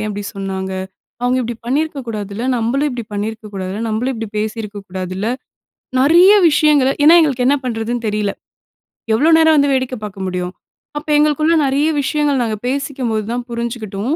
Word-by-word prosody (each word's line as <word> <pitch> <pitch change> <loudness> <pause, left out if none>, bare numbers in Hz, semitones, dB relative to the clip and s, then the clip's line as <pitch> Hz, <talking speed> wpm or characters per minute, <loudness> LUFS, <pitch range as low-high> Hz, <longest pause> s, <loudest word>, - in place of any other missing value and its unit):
ஏன் 215 - -2
இப்படி 205 0 -5
சொன்னாங்க? 190 -1 -4 0.5
அவங்க 250 +1 +2
இப்படி 235 -1 -4
பண்ணியிருக்க 295 +3 -1
கூடாதுல்ல, 210 +1 -4
நம்மளும் 260 +6 0
இப்படி 240 -2 -5
பண்ணியிருக்க 215 +2 -4
கூடாதுல்ல, 190 +2 -4
நம்மளும் 230 +5 -1
இப்படி 225 -1 -5
பேசியிருக்க 215 -1 -4
கூடாதுல்ல, 185 +2 -4 0.7
நிறைய 340 +8 +6 0.2
விஷயங்கள 295 -3 +4 0.2
ஏனா 320 - +8
எங்களுக்கு 265 -6 +1
என்ன 285 +2 +4
பண்றதுன்னு 235 0 -3
தெரியல. 210 -1 -1 0.8
எவ்வளோ 290 +9 +3
நேரம் 320 -1 +5
வந்து 285 -1 +3
வேடிக்க 260 -1 -1
பார்க்க 195 -2 -6
முடியும்? 180 0 -3 0.4
அப்ப 295 - -6
எங்களுக்குள்ள 305 +2 +3
நெறைய 280 +3 +1
விஷயங்கள் 285 -2 +1
நாங்க 220 -2 -1
பேசிக்கும்போது 255 -5 -2
தான் 245 0 -3
புரிஞ்சிக்கிட்டோம். 235 +1 -3
235 Hz, 155 wpm, -17 LUFS, 210-280 Hz, 0.8 s, ஏனா